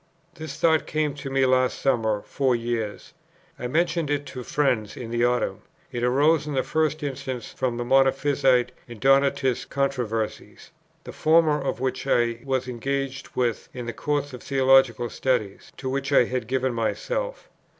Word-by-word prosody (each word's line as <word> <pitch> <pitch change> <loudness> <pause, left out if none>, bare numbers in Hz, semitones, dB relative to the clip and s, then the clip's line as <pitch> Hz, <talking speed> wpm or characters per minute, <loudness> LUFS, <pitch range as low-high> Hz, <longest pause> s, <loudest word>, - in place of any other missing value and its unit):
"This 160 -4 -8
thought 160 -1 +3
came 155 -2 0
to 140 -1 -7
me 135 0 +2
last 130 0 +2
summer 110 -6 +1
four 130 -3 0
years.... 115 -3 -4 0.5
I 125 - -3
mentioned 165 +2 0
it 145 0 -1
to - - -10
two 125 -2 -6
friends 120 -7 0
in 115 -2 -6
the 120 0 +1
autumn.... 125 0 +1 0.3
It 120 0 -3
arose 145 +5 +3
in 145 - -3
the 130 - +1
first 155 -1 0
instance 130 -4 -5
from 125 -2 -2
the 120 - -3
Monophysite 135 -1 +3 0.2
and 120 -3 -10
Donatist 135 -1 +2
controversies, 125 -6 -3 0.3
the - - -8
former 155 -2 +3
of 135 - -2
which 130 0 -2
I 115 -1 +2
was 130 -2 -1
engaged 135 +2 -4
with 120 -3 -1
in 125 -1 -5
the 120 - -4
course 145 +2 -2
of 125 - -8
theological 130 -3 +3
study 120 -6 -1 0.2
to 130 - -6
which 135 +1 -2
I 140 - +6
had 125 -1 -3
given 130 0 0
myself. - - -3
130 Hz, 170 wpm, -25 LUFS, 120-140 Hz, 0.5 s, I